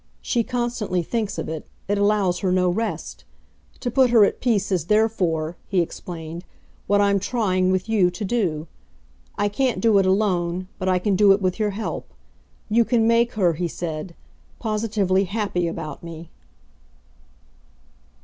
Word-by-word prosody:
She 235 -2 +1
constantly 240 -7 -2
thinks 215 +2 -2
of - - -3
it 160 -1 -6 0.2
it 205 +1 0
allows 205 -3 +2
her 190 -2 0
no 180 0 +3
rest. 225 +5 -4 0.6
To 245 - -2
put 260 0 +4
her 230 -3 +6
at - - -3
peace 225 -6 +1
is 180 -4 0
therefore," 180 -6 +1
he 195 - +1
explained, 170 0 -5 0.4
"what 205 +1 +3
I'm 200 -1 +3
trying, 185 -4 +1
with 185 +2 0
you, 205 -5 +3
to 205 +4 -5
do. 175 -8 -1 0.7
I 205 - +2
can't 250 +5 0
do 220 -3 +4
it 190 - +2
alone, 185 -2 +1
but 185 - -1
I 185 - +3
can 195 +2 +1
do 200 0 +6
it 195 - +1
with 185 +1 -1
your 210 -1 +1
help. 220 - -5 0.5
You 230 +2 +4
can 230 -1 +2
make 235 +1 +3
her," 185 -6 +2
he 175 +2 -2
said, 165 0 -5 0.4
"positively 210 -4 0
happy 200 -3 -1
about 165 -2 -6
me." 165 0 -9
195 Hz, 160 wpm, -23 LUFS, 180-220 Hz, 0.7 s, her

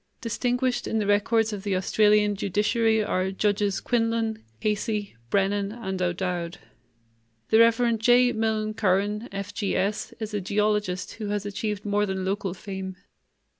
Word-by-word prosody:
Distinguished 245 +1 -1
in 225 - -1
the 215 - 0
records 215 +2 +2
of 200 - -4
the 200 -1 -1
Australian 210 +2 +3
judiciary 215 +3 +1
are 185 -2 0
Judges 205 0 0
Quinlan, 230 -2 0 0.2
Casey, 210 - -1
Brennan, 200 +4 +1
and 190 -5 -4
O'Dowd. 175 -1 -2 0.9
The 220 - +6
Rev. 230 0 +4
J. 245 +2 +5
Milne 220 -1 -1
Curran, 205 +3 0
F.G.S., 200 0 -2
is 215 -1 -5
a 205 - -1
geologist 205 -2 0
who 210 - -2
has 205 0 -2
achieved 205 0 -3
more 205 0 +1
than 190 -1 -2
local 195 -1 -2
fame. 190 -1 -6
210 Hz, 135 wpm, -26 LUFS, 195-220 Hz, 0.9 s, The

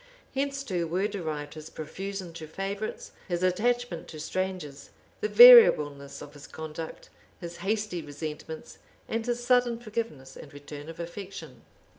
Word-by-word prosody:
Hence 275 0 -1
too 180 -9 -2
were 185 +5 0
derived 155 -8 -4
his 155 0 -9
profusion 190 +3 -6
to 160 -1 -8
favorites, 195 +6 -5 0.2
his 175 -1 -2
attachment 220 0 0
to 155 - -9
strangers, 180 -3 -4 0.3
the 430 - -1
variableness 150 - +8
of 145 0 -12
his 145 -1 -12
conduct, 160 +1 -8 0.3
his 170 -1 -7
hasty 205 -3 -2
resentments, 155 +1 -7 0.3
and 225 0 -2
his 240 0 -2
sudden 245 -2 +3
forgiveness 215 - -5
and 140 - -11
return 145 +1 -9
of 165 - -10
affection. 190 +3 -8
180 Hz, 140 wpm, -28 LUFS, 155-215 Hz, 0.3 s, variableness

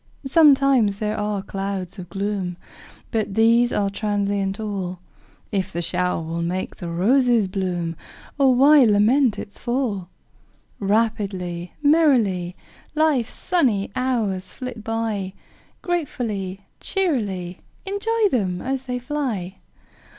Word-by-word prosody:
Sometimes 270 -8 +5
there 210 0 -2
are 210 -2 -2
clouds 195 -1 -4
of 180 -1 -8
gloom, 195 -2 -3 0.5
But 215 -4 -1
these 230 +2 +4
are 200 -1 0
transient 200 -1 -1
all; 195 -4 -3 0.5
If 195 -2 -1
the 170 -1 -3
shower 180 -1 0
will 165 +1 -3
make 180 +2 -3
the 175 - -6
roses 230 +5 +3
bloom, 180 -3 -2 0.4
O 275 -1 +5
why 275 +3 +7
lament 225 +3 +4
its 205 - -8
fall? 240 -8 -2 0.7
Rapidly, 195 -5 -1
merrily, 240 - +3 0.4
Life's 300 -7 +2
sunny 250 - +1
hours 215 -8 -1
flit 250 -4 -7
by, 220 -4 -2 0.5
Gratefully, 225 - -2 0.2
cheerily 205 - -1 0.3
Enjoy 425 +3 +1
them 185 -7 0
as 265 +3 -3
they 250 -1 -2
fly! 245 -9 -3
210 Hz, 115 wpm, -22 LUFS, 190-255 Hz, 0.7 s, why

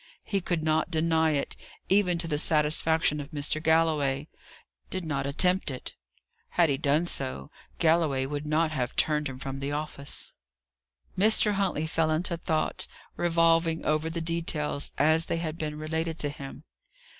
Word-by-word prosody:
He 200 -2 -1
could 170 -3 -1
not 155 +2 +1
deny 160 -1 +2
it, 140 - -2 0.3
even 190 -3 +3
to 165 - -3
the 150 -2 0
satisfaction 155 0 +3
of 145 0 -7
Mr. 155 -1 -1
Galloway: 155 -3 +2 0.6
did 185 -2 -4
not 140 -3 -2
attempt 180 +6 +1
it; 130 -2 -4 0.6
had 170 -3 +3
he 140 - +1
done 150 +3 +2
so, 70 - -4 0.3
Galloway 160 -5 +2
would 145 +2 -4
not 155 +1 +2
have 125 -5 -2
turned 150 -2 +1
him 130 - -7
from 135 +1 -5
the 140 +1 -3
office." 145 -1 -5 0.8
Mr. 210 +2 +4
Huntley 190 -6 0
fell 160 0 0
into 165 +2 0
thought, 160 -2 -1 0.3
revolving 165 -1 +2
over 155 +1 +1
the 165 0 -4
details, 160 -3 -1
as 160 +3 +4
they - - -1
had 165 -1 -4
been 150 -1 -3
related 160 +1 -2
to 145 - 0
him. 140 0 -9
155 Hz, 155 wpm, -28 LUFS, 145-165 Hz, 0.8 s, Mr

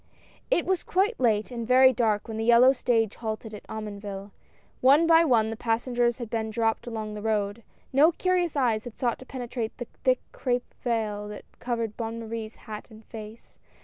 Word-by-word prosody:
I - - +6
T - - +2
was 375 -1 0
quite 400 +6 0
late 220 -2 +2
and 235 -2 -4
very 260 +1 +6
dark 220 -3 +1
when 220 -1 -5
the 220 - -1
yellow 240 +3 +6
stage 225 -4 0
halted 220 -1 -5
at 210 - -10
Omonville. 205 -2 -6 0.5
One 280 +6 +6
by 330 0 +6
one 225 -7 +3
the - - -4
pas 225 0 -1
sengers 240 -2 +1
had 240 -3 -5
been 220 0 -2
dropped 225 +1 0
along 220 -2 -4
the 210 - -6
road. 210 0 -1 0.3
No 295 +5 +6
curious 355 -1 0
eyes 235 -5 +1
had 240 - -9
sought 240 -2 0
to 260 - -12
penetrate 245 -3 -5
the 240 - -5 0.2
tliick 255 -1 +4
crape 245 -1 -2
vail 215 -4 -1
that 210 - -9
covered 230 -3 -3
Bonne 230 0 -4
Marie's 225 -1 -6
hat 215 -2 -9
and 220 0 -15
face. 220 0 -11
230 Hz, 195 wpm, -27 LUFS, 220-255 Hz, 0.5 s, I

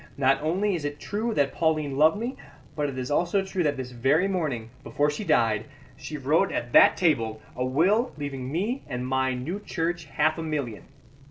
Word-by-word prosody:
Not 135 0 +3
only 190 +7 +1
is 165 -4 -3
it 145 0 -4
true 220 +4 -2
that 140 -1 +1
Pauline 155 -4 0
loved 155 +6 +4
me, 240 +5 -3 0.4
but 150 -2 -1
it 135 - -7
is 130 +2 -4
also 175 +6 +2
true 190 -1 -2
that 145 -4 +1
this 130 -1 -5
very 135 +9 +2
morning, 140 -12 -2
before 145 +1 0
she 150 - -5
died, 110 - +2 0.3
she 155 - -7
wrote 155 +8 +2
at 120 0 -3
that - - +7
table 115 -11 +1 0.2
a 125 - -1
will 185 - +2
leaving 135 -3 -5
me 210 - -1
and 125 0 -4
my 130 0 0
new 155 +11 -4
church 170 -3 -3
half 155 +2 0
a - - -2
million. 145 -9 -3
150 Hz, 195 wpm, -26 LUFS, 130-175 Hz, 0.4 s, that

